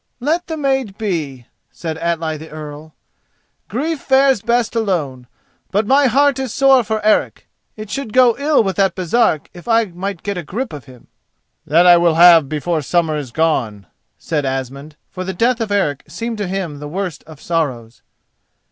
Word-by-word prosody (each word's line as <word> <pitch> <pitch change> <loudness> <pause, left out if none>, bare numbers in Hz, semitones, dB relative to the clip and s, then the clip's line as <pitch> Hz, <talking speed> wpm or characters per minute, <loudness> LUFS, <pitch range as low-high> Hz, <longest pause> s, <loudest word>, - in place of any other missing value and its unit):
"Let 315 +7 -1
the 320 - -4
maid 265 -8 -1
be," 155 - -3 0.2
said 160 -2 -6
Atli 165 -2 -2
the 155 +1 -10
Earl. 155 0 -10 0.7
"Grief 295 - -2
fares 265 -4 +3
best 235 0 0
alone. 155 - -2 0.4
But 205 +3 0
my 275 +4 +4
heart 280 +1 +2
is 265 -3 -3
sore 270 -1 +4
for 215 -1 -3
Eric. 215 - +1 0.3
It 215 -1 -8
should 275 -5 -4
go 250 -1 +5
ill 290 -3 +3
with 195 -2 -3
that 195 -3 +2
Baresark 185 -3 +1
if 175 +2 -13
I 230 -1 +3
might 185 0 -6
get 200 -3 -3
a - - -6
grip 230 - -5
of 145 -5 -9
him." 125 -2 -16 0.6
"That 165 +4 +4
I 175 -1 +8
will 170 -2 +2
have 165 -4 +7
before 155 +2 -1
summer 160 +1 0
is 145 -4 -5
gone," 120 -9 -1 0.3
said 150 -3 -2
Asmund, 135 +3 -5 0.2
for 185 - -5
the 190 +1 -4
death 235 +4 +1
of 220 -2 -3
Eric 150 -9 0
seemed 230 -1 -5
to 205 - -2
him 180 -6 -4
the 150 - -7
worst 180 0 -5
of 155 -3 -13
sorrows. 130 -10 -3
180 Hz, 180 wpm, -18 LUFS, 155-230 Hz, 0.7 s, I